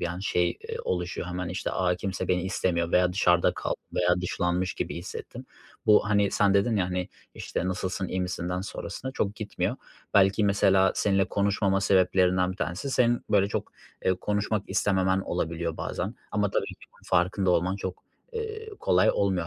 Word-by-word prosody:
bir 85 Hz, -, 0 dB
an 85 Hz, +1 st, -5 dB
şey, 90 Hz, -3 st, +1 dB, 0.2 s
eee, -, -, -3 dB
oluşuyor, 90 Hz, -1 st, -2 dB
hemen 90 Hz, 0 st, -3 dB
işte, 90 Hz, -, -3 dB
a, 90 Hz, -1 st, +1 dB
kimse 95 Hz, -1 st, -4 dB
beni 90 Hz, -1 st, +2 dB
istemiyor 85 Hz, -3 st, -1 dB
veya 90 Hz, 0 st, +4 dB
dışarıda 90 Hz, -2 st, +3 dB
kal -, -, -2 dB, 0.2 s
veya 90 Hz, 0 st, +2 dB
dışlanmış 90 Hz, 0 st, -1 dB
gibi -, -, -3 dB
hissettim. 90 Hz, +3 st, -7 dB, 0.4 s
Bu, 105 Hz, -1 st, +5 dB
hani, 100 Hz, -1 st, +3 dB
sen 100 Hz, -1 st, +3 dB
dedin 105 Hz, +3 st, +3 dB
ya, 95 Hz, -, +2 dB
hani, 90 Hz, 0 st, -2 dB, 0.3 s
işte, 90 Hz, -, -3 dB
"Nasılsın, 95 Hz, 0 st, -2 dB
iyi 95 Hz, -, -2 dB
misinden 90 Hz, 0 st, -2 dB
sonrasına, 130 Hz, +6 st, -6 dB
çok 105 Hz, -5 st, -1 dB
gitmiyor." 105 Hz, -1 st, -2 dB, 0.4 s
Belki 100 Hz, +2 st, +5 dB
mesela 95 Hz, -1 st, +4 dB
seninle 95 Hz, -1 st, +2 dB
konuşmama 100 Hz, 0 st, +1 dB
sebeplerinden 95 Hz, -1 st, +3 dB
bir -, -, -12 dB
tanesi 90 Hz, +8 st, -3 dB
senin 120 Hz, -2 st, +2 dB
böyle 100 Hz, -1 st, +4 dB
çok, -, -, -4 dB, 0.3 s
eee, 95 Hz, -, +3 dB
konuşmak 105 Hz, +2 st, -1 dB
istememen 95 Hz, -1 st, +2 dB
olabiliyor 85 Hz, -2 st, -2 dB
bazen -, -, -3 dB, 0.2 s
ama 105 Hz, -1 st, +1 dB
tabii -, -, 0 dB
ki -, -, -7 dB, 0.3 s
farkında 90 Hz, +1 st, +2 dB
olman 90 Hz, +2 st, +1 dB
çok, 95 Hz, -2 st, -6 dB, 0.3 s
eee, 445 Hz, -1 st, -5 dB
kolay 90 Hz, +1 st, +4 dB
olmuyor 95 Hz, -4 st, 0 dB
95 Hz, 170 wpm, -27 LUFS, 90-100 Hz, 0.4 s, Bu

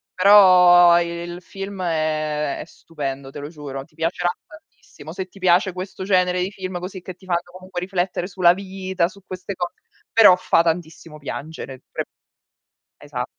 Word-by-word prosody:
Però 180 Hz, -3 st, +7 dB
il 170 Hz, +1 st, -5 dB
film 195 Hz, 0 st, -7 dB
è 155 Hz, -3 st, -1 dB
è -, -, -6 dB
stupendo, 140 Hz, -5 st, -7 dB
te 145 Hz, -, -8 dB
lo 145 Hz, +1 st, -7 dB
giuro. 140 Hz, -4 st, -7 dB
Ti 155 Hz, +1 st, -25 dB
piacerà 170 Hz, +2 st, -1 dB, 0.2 s
tantissimo. 300 Hz, -, -14 dB
Se 190 Hz, +2 st, -5 dB
ti 195 Hz, -, -17 dB
piace 185 Hz, +1 st, +3 dB
questo 185 Hz, +1 st, -6 dB
genere 180 Hz, -2 st, +2 dB
di 190 Hz, +3 st, -2 dB
film 185 Hz, -2 st, -5 dB
così, 185 Hz, +1 st, -7 dB
che 185 Hz, -1 st, -9 dB
ti 185 Hz, -, -19 dB
fanno 175 Hz, -1 st, 0 dB
comunque 185 Hz, 0 st, -7 dB
riflettere 180 Hz, -1 st, -2 dB
sulla 180 Hz, -2 st, +4 dB
vita, 190 Hz, -2 st, -2 dB
su 200 Hz, 0 st, -15 dB
queste 185 Hz, +1 st, -6 dB
cose, 175 Hz, -1 st, -4 dB, 0.4 s
però 210 Hz, -5 st, +8 dB
fa 175 Hz, -2 st, +2 dB
tantissimo 165 Hz, -2 st, -3 dB
piangere, 145 Hz, -2 st, -7 dB
pre -, -, -3 dB, 0.9 s
esa 130 Hz, -4 st, -5 dB
175 Hz, 160 wpm, -22 LUFS, 160-185 Hz, 0.9 s, però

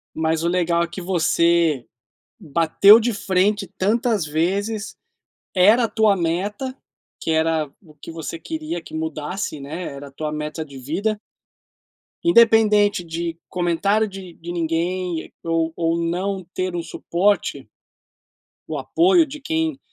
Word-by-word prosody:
Mas 160 Hz, +1 st, 0 dB
o -, -, +2 dB
legal 170 Hz, -1 st, +1 dB
é -, -, 0 dB
que 170 Hz, +3 st, -7 dB
você 170 Hz, -5 st, +2 dB, 0.5 s
bateu 170 Hz, +6 st, +6 dB
de 235 Hz, +1 st, 0 dB
frente 200 Hz, +1 st, +1 dB
tantas 215 Hz, -1 st, +1 dB
vezes, 200 Hz, +8 st, -1 dB, 0.6 s
era 210 Hz, +6 st, +5 dB
a -, -, 0 dB
tua 215 Hz, -3 st, +3 dB
meta, 200 Hz, +10 st, -2 dB, 0.4 s
que -, -, -3 dB
era 160 Hz, -2 st, +1 dB
o 155 Hz, -6 st, -19 dB
que 150 Hz, -, -11 dB
você 165 Hz, 0 st, -6 dB
queria 310 Hz, -, -5 dB
que -, -, -14 dB
mudasse, 160 Hz, +1 st, -4 dB
né, 160 Hz, +6 st, -6 dB
era 140 Hz, -1 st, -7 dB
a -, -, -17 dB
tua 150 Hz, +2 st, -4 dB
meta 150 Hz, +1 st, -4 dB
de 140 Hz, -3 st, -11 dB
vida 195 Hz, -, -2 dB, 1.1 s
independente 220 Hz, -, +5 dB
de 165 Hz, 0 st, -4 dB
comentário 185 Hz, +5 st, +1 dB
de 190 Hz, -3 st, -9 dB
de 170 Hz, +1 st, -7 dB
ninguém, 170 Hz, +1 st, -2 dB
ou 165 Hz, -1 st, 0 dB
ou 165 Hz, 0 st, 0 dB
não 185 Hz, +2 st, -2 dB
ter 185 Hz, -1 st, -2 dB
um 170 Hz, -, -2 dB
suporte 180 Hz, +4 st, -1 dB, 1.0 s
o -, -, -3 dB
apoio 345 Hz, -1 st, +3 dB
de 300 Hz, +1 st, -9 dB
quem, 320 Hz, 0 st, -1 dB
175 Hz, 140 wpm, -22 LUFS, 165-205 Hz, 1.1 s, bateu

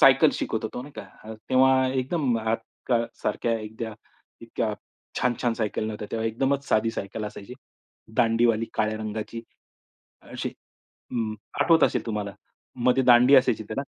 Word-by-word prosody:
Cycle -, -, +7 dB
शिकत -, -, -2 dB
होतो, 125 Hz, -, -4 dB
नाही 145 Hz, -, -11 dB
का. -, -, -6 dB, 0.5 s
तेव्हा 130 Hz, 0 st, +5 dB
एकदम 130 Hz, -1 st, 0 dB
आजकाल 115 Hz, +1 st, -1 dB, 0.2 s
सारख्या 115 Hz, -, 0 dB
एखाद्या 110 Hz, +1 st, -6 dB, 0.5 s
इतक्या -, -, -2 dB, 0.5 s
छान-छान 120 Hz, -1 st, +1 dB
सायकल 110 Hz, -1 st, -2 dB
नव्हत्या. 105 Hz, -1 st, -5 dB
तेव्हा 115 Hz, 0 st, -1 dB
एकदमच 135 Hz, +5 st, 0 dB
साधी 110 Hz, +1 st, +2 dB
सायकल 100 Hz, +1 st, -5 dB
असायची. 105 Hz, +3 st, -8 dB, 0.6 s
दांडीवाली 115 Hz, -1 st, +3 dB
काळ्या 110 Hz, 0 st, 0 dB
रंगाची 110 Hz, +1 st, -5 dB, 0.8 s
अशी. -, -, -5 dB, 0.6 s
अ, -, -, -5 dB, 0.5 s
आठवत 165 Hz, -1 st, +5 dB
असेल -, -, +1 dB
तुम्हाला. 105 Hz, -3 st, -3 dB, 0.5 s
मधे 125 Hz, +1 st, +4 dB
दांडी 125 Hz, +2 st, +7 dB
असायची 115 Hz, -4 st, +3 dB
त्याला. 110 Hz, +6 st, -4 dB
115 Hz, 135 wpm, -26 LUFS, 110-130 Hz, 0.8 s, सायकल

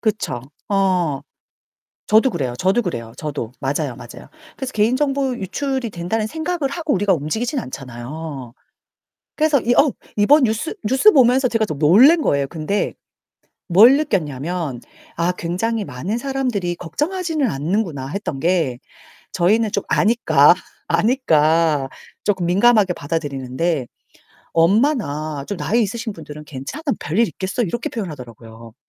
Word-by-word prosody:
그쵸. 210 Hz, -, -1 dB, 0.3 s
어. 185 Hz, -8 st, +1 dB, 0.9 s
저도 220 Hz, +5 st, +5 dB
그래요, 135 Hz, -, -2 dB
저도 195 Hz, +6 st, +2 dB
그래요, 115 Hz, -, -5 dB
저도. 145 Hz, -6 st, -5 dB
맞아요, 135 Hz, -1 st, -2 dB
맞아요. 120 Hz, -, -12 dB, 0.3 s
그래서 265 Hz, -1 st, -5 dB
개인 220 Hz, +4 st, +2 dB
정보 275 Hz, -2 st, 0 dB
유출이 260 Hz, +5 st, -2 dB
된다는 195 Hz, +6 st, -2 dB
생각을 320 Hz, +2 st, -2 dB
하고 320 Hz, -2 st, -2 dB
우리가 200 Hz, -1 st, +2 dB
움직이진 220 Hz, -, -2 dB
않잖아요. 130 Hz, -, -7 dB, 0.8 s
그래서 310 Hz, -2 st, +3 dB
이 240 Hz, -, +2 dB
어 285 Hz, -3 st, +5 dB, 0.3 s
이번 280 Hz, +8 st, +5 dB
뉴스 225 Hz, +9 st, -2 dB
뉴스 265 Hz, -, +5 dB
보면서 255 Hz, -1 st, +4 dB
제가 225 Hz, -2 st, +1 dB
좀 155 Hz, -8 st, -5 dB
놀랜 240 Hz, -, +6 dB
거예요. 140 Hz, -1 st, +1 dB
근데 165 Hz, +6 st, -2 dB, 0.8 s
뭘 220 Hz, +9 st, +7 dB
느꼈냐면 160 Hz, -, -2 dB, 0.4 s
아 170 Hz, +2 st, +1 dB
'굉장히 200 Hz, +6 st, -2 dB
많은 175 Hz, -, -4 dB
사람들이 245 Hz, -9 st, -2 dB
걱정하지는 310 Hz, -, -2 dB
않는구나.' 155 Hz, -2 st, -2 dB
했던 150 Hz, -5 st, -4 dB
게 160 Hz, -6 st, 0 dB, 0.6 s
저희는 210 Hz, +5 st, +2 dB
좀 200 Hz, -, 0 dB
아니까 170 Hz, -10 st, +4 dB, 0.3 s
아니까 165 Hz, -, +2 dB, 0.3 s
조금 190 Hz, -4 st, 0 dB
민감하게 200 Hz, +1 st, +4 dB
받아들이는데. 145 Hz, -2 st, -2 dB, 0.7 s
엄마나 165 Hz, -, +1 dB
좀 205 Hz, -, -4 dB
나이 230 Hz, +6 st, 0 dB
있으신 225 Hz, +2 st, -2 dB
분들은 150 Hz, -4 st, -10 dB
"괜찮아, 145 Hz, -, -7 dB, 0.2 s
별일 200 Hz, +10 st, +1 dB
있겠어." 190 Hz, +5 st, -3 dB
이렇게 235 Hz, +3 st, -2 dB
표현하더라고요. 115 Hz, -, -8 dB
185 Hz, 320 characters per minute, -20 LUFS, 150-235 Hz, 0.9 s, 뭘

